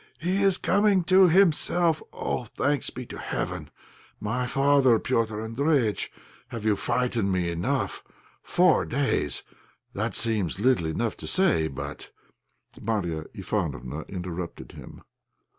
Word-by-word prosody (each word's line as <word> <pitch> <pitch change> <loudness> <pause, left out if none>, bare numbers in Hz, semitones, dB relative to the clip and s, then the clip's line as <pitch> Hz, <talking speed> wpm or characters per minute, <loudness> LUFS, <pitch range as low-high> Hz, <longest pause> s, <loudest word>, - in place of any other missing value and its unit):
he 185 +4 0
is 195 -2 +4
coming 200 -1 +3
to 185 +1 +6
himself! 170 -2 +3
Oh! 125 - -3
thanks 140 +4 -1
be 125 0 -7
to - - -9
heaven! - - -4 0.5
My 125 +4 -2
father 135 -2 +4
Petr' 110 -2 -1
Andréjïtch, 135 - +1 0.4
have 115 -4 -7
you 105 -2 +3
frightened 115 -1 0
me 90 -2 0
enough? 85 +1 -2 0.4
Four 180 -1 +3
days! 135 - 0 0.5
That - - -2
seems 105 -7 0
little 115 -7 +2
enough 110 +8 -1
to - - -7
say, 170 - +3
but 70 - -7 0.4
" - - -21
Marya 85 -8 -2
Ivánofna 65 +6 -3
interrupted 90 -2 -6
him. - - -12
120 Hz, 125 wpm, -26 LUFS, 95-155 Hz, 0.5 s, to